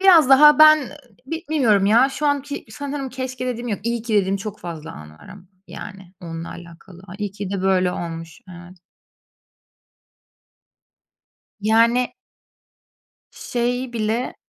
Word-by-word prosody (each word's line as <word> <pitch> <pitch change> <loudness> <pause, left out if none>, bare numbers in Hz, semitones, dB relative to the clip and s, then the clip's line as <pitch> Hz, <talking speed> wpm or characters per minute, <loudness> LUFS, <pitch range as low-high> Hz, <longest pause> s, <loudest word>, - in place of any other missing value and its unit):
biraz 345 -7 +6
daha 295 +2 +7
ben 310 0 +8
ı 260 - -10 0.3
bi 325 +4 -5
bilmiyorum 220 -10 +3
ya, 235 +6 +5
şu 295 +2 -3
anki 285 0 -2
sanırım 280 +1 -5
keşke 255 0 -5
dediğim 245 -1 -4
yok, 205 - -3
iyi 235 0 -2
ki 230 -1 -3
dediğim 195 -1 +2
çok 210 +1 -7
fazla 165 -2 -8
an 75 0 -12
var 75 0 -17
ama, 200 - -12 0.3
yani, 195 -3 -10
onunla 165 -1 -7
alakalı, 175 +1 -13
ay, 185 - -10
iyi 205 -1 -3
ki 200 -2 -6
de 195 -1 -3
böyle 185 -1 +2
olmuş 165 -2 -7
Evet. 175 +1 -13 2.8
Yani 230 +3 +2 1.2
şeyi 245 +1 -3
bile 230 +2 -2
220 Hz, 140 wpm, -21 LUFS, 185-260 Hz, 2.8 s, ben